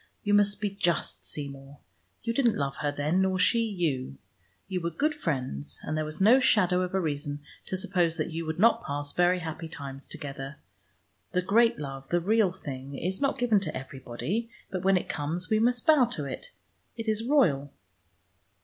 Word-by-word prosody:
You 205 Hz, -, +1 dB
must 205 Hz, 0 st, +3 dB
be 205 Hz, -2 st, -1 dB
just, 185 Hz, -4 st, -1 dB
Seymour: 140 Hz, -1 st, -6 dB, 0.5 s
you 230 Hz, -, -1 dB
didn't 235 Hz, -3 st, +2 dB
love 140 Hz, -1 st, -2 dB
her 145 Hz, -, -1 dB
then, 150 Hz, +6 st, +1 dB
nor 190 Hz, 0 st, +2 dB
she 230 Hz, +5 st, +4 dB
you. 160 Hz, -, -2 dB, 0.5 s
You 185 Hz, -2 st, -2 dB
were 170 Hz, -, -1 dB
good 300 Hz, -, 0 dB
friends, 130 Hz, -, -3 dB
and 155 Hz, -, -2 dB
there 155 Hz, -, 0 dB
was 155 Hz, +1 st, -6 dB
no 225 Hz, +7 st, +7 dB
shadow 185 Hz, -8 st, +4 dB
of 180 Hz, +1 st, -2 dB
a -, -, +3 dB
reason 145 Hz, -3 st, -3 dB, 0.3 s
to 185 Hz, -, -2 dB
suppose 175 Hz, -3 st, +1 dB
that 155 Hz, +1 st, -2 dB
you 165 Hz, +1 st, -3 dB
would 160 Hz, -, -2 dB
not 230 Hz, +4 st, +4 dB
pass 145 Hz, 0 st, -4 dB
very 180 Hz, +1 st, +3 dB
happy 165 Hz, 0 st, -5 dB
times 140 Hz, -3 st, -8 dB
together. 140 Hz, -1 st, -7 dB, 0.8 s
The 180 Hz, -, +1 dB
great 230 Hz, +5 st, +4 dB
love, 135 Hz, -2 st, -7 dB
the 175 Hz, -, +2 dB
real 205 Hz, +2 st, +3 dB
thing, 140 Hz, -6 st, -7 dB
is 185 Hz, -, -2 dB
not 275 Hz, -1 st, +1 dB
given 240 Hz, -5 st, +3 dB
to 180 Hz, -5 st, -3 dB
everybody. 135 Hz, -, -4 dB, 0.2 s
But 185 Hz, -1 st, -2 dB
when 195 Hz, 0 st, +4 dB
it -, -, -3 dB
comes, 160 Hz, +6 st, +1 dB
we 215 Hz, -, +4 dB
must 245 Hz, +1 st, +1 dB
bow 305 Hz, -5 st, +6 dB
to 180 Hz, -11 st, -4 dB
it.... -, -, -6 dB, 0.5 s
It 225 Hz, 0 st, -5 dB
is 215 Hz, 0 st, +1 dB
royal." 175 Hz, -, +3 dB
175 Hz, 190 wpm, -28 LUFS, 145-210 Hz, 0.8 s, no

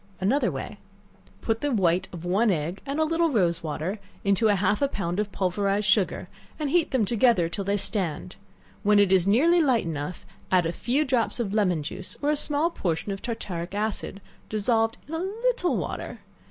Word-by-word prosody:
Another 225 Hz, +10 st, +2 dB
Way. -, -, -6 dB, 0.6 s
Put 225 Hz, 0 st, -1 dB
the 290 Hz, -, 0 dB
white 185 Hz, -6 st, +2 dB
of 175 Hz, -1 st, -8 dB
one 200 Hz, +6 st, +2 dB
egg 170 Hz, +1 st, -1 dB
and 280 Hz, +3 st, -2 dB
a -, -, +4 dB
little 330 Hz, +1 st, +2 dB
rose 175 Hz, -, +1 dB
water 160 Hz, +6 st, -3 dB, 0.2 s
into 200 Hz, +2 st, +3 dB
half 205 Hz, +1 st, +2 dB
a 280 Hz, -, +4 dB
pound 190 Hz, -7 st, -3 dB
of 210 Hz, -1 st, -1 dB
pulverized 200 Hz, +2 st, 0 dB
sugar, 200 Hz, -2 st, +2 dB, 0.3 s
and 295 Hz, -3 st, -2 dB
heat 340 Hz, -1 st, +3 dB
them 255 Hz, -5 st, +1 dB
together 230 Hz, -5 st, +3 dB
till 195 Hz, +4 st, -4 dB
they 200 Hz, +1 st, +1 dB
stand; 185 Hz, -4 st, -2 dB, 0.5 s
when 210 Hz, 0 st, +4 dB
it 200 Hz, -2 st, +4 dB
is 190 Hz, -1 st, +4 dB
nearly 325 Hz, +12 st, +4 dB
light 255 Hz, -, +2 dB
enough, 155 Hz, +1 st, -5 dB, 0.3 s
add 180 Hz, -2 st, +4 dB
a 165 Hz, -, 0 dB
few 265 Hz, -, 0 dB
drops 250 Hz, -3 st, 0 dB
of 210 Hz, -4 st, -2 dB
lemon 180 Hz, -7 st, +1 dB
juice, 185 Hz, +5 st, -6 dB
or 290 Hz, +1 st, +1 dB
a -, -, +2 dB
small 300 Hz, +3 st, 0 dB
portion 175 Hz, -, -2 dB
of 195 Hz, -, -5 dB
tartaric 190 Hz, -6 st, -4 dB
acid, 205 Hz, -1 st, -3 dB, 0.3 s
dissolved 225 Hz, +1 st, +1 dB
in 310 Hz, -, -8 dB
a 325 Hz, -, -1 dB
little 425 Hz, +1 st, 0 dB
water. -, -, -4 dB
205 Hz, 190 wpm, -26 LUFS, 185-260 Hz, 0.6 s, a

